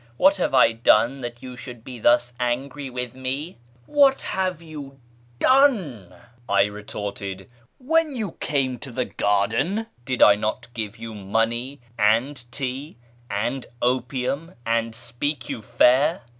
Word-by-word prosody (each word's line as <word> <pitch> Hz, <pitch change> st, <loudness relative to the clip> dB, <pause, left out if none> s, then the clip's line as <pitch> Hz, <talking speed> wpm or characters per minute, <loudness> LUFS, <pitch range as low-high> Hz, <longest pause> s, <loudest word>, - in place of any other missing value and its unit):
What 195 Hz, +6 st, +5 dB
have 175 Hz, -, 0 dB
I 130 Hz, -, +6 dB
done 115 Hz, +3 st, +3 dB
that 120 Hz, +1 st, -7 dB
you 125 Hz, -1 st, -7 dB
should 125 Hz, -2 st, -10 dB
be 125 Hz, -1 st, -8 dB
thus 120 Hz, +2 st, +3 dB
angry 135 Hz, +3 st, -2 dB
with 125 Hz, -1 st, -4 dB
me? 130 Hz, +5 st, -4 dB
" 120 Hz, +1 st, -31 dB
" 120 Hz, -, -31 dB
What 275 Hz, -1 st, +6 dB
have 185 Hz, -3 st, -1 dB
you 150 Hz, -4 st, -9 dB, 0.4 s
done? 190 Hz, -, +3 dB, 0.2 s
" 120 Hz, 0 st, -28 dB
I 100 Hz, 0 st, +5 dB
retorted; 100 Hz, -2 st, -5 dB, 0.2 s
" -, -, -40 dB
when 310 Hz, +2 st, +1 dB
you 215 Hz, -7 st, -3 dB
came 130 Hz, -4 st, -1 dB
to 130 Hz, -, -8 dB
the 125 Hz, +1 st, -1 dB
garden, 110 Hz, -, 0 dB, 0.2 s
did 130 Hz, 0 st, +2 dB
I 105 Hz, -, +9 dB
not 110 Hz, +4 st, -3 dB
give 110 Hz, -2 st, -4 dB
you 115 Hz, 0 st, -7 dB
money 115 Hz, +6 st, -1 dB, 0.2 s
and 120 Hz, +6 st, +2 dB
tea 135 Hz, +4 st, -4 dB, 0.3 s
and 120 Hz, +6 st, -2 dB
opium, 130 Hz, +6 st, -1 dB
and 115 Hz, 0 st, 0 dB
speak 120 Hz, +3 st, -4 dB
you 115 Hz, -, -4 dB
fair 135 Hz, +9 st, +3 dB
125 Hz, 155 wpm, -24 LUFS, 115-145 Hz, 0.4 s, I